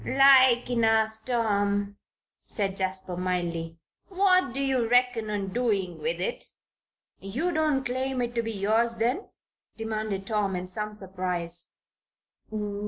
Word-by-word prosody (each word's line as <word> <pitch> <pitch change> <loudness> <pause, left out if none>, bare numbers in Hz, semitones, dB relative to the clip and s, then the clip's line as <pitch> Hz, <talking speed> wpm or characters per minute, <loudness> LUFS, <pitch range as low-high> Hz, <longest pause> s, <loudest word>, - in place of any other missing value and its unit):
"Like 260 -2 +6
enough, 220 -2 +2
Tom," 205 -4 0 0.4
said 195 -2 -2
Jasper, 190 -1 -2
mildly. 170 -2 -2 0.3
"What 370 -6 +3
do 265 - -5
you 260 -4 +1
reckon 245 -3 +2
on 200 -2 -3
doing 205 -8 -1
with 485 +2 -1
it?" 485 - 0 0.8
"You 250 - -2
don't 305 -5 +1
claim 260 +1 -1
it 240 0 -3
to 235 - 0
be 225 0 -4
yours, 225 +3 +1
then?" 245 - -1 0.5
demanded 215 -3 -3
Tom, 205 -3 0
in 180 0 -4
some 210 +3 -4
surprise. 180 -3 -4
220 Hz, 125 wpm, -27 LUFS, 195-250 Hz, 0.8 s, Like